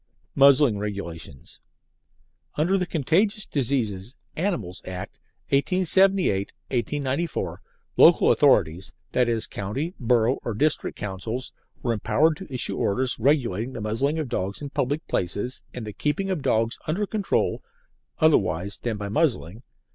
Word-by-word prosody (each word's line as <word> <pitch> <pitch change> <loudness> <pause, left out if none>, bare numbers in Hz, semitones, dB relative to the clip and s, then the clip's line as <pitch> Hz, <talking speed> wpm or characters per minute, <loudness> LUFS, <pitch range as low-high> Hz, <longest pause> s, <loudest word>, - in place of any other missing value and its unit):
MUZZLING 140 -5 +5
REGULATIONS 85 -9 -6 1.0
Under 170 +6 +2
the 180 -2 0
Contagious 195 - +1
Diseases 120 -5 -2 0.2
(Animals) 120 - -2
Acts, 90 -1 -7 0.3
1878 185 - +2 0.2
1894, 140 +4 -2 0.4
local - - +7
authorities 85 +5 +2 0.2
(i.e., 120 -3 +2
county, 130 - -3
borough, 120 0 +2
or 115 - -4
district 150 +7 0
councils) 105 +6 -5 0.3
were 120 - +1
empowered 155 +8 +2
to 190 -5 -10
issue 125 -2 +1
orders 125 +5 0
regulating 125 -3 +1
the 115 - -6
muzzling 115 +9 -1
of 155 -3 -2
dogs 100 -5 -3
in 145 -2 -7
public 145 +2 -2
places 100 +8 -2
and 120 - -7
the 105 - -7
keeping 170 - -1
of 180 -5 -2
dogs 115 -4 0
under 180 +7 0
control 205 -1 -1 0.6
(otherwise 100 - +2
than 115 -3 -3
by 100 0 -5
muzzling). 115 - -1
125 Hz, 125 wpm, -25 LUFS, 105-155 Hz, 1.0 s, local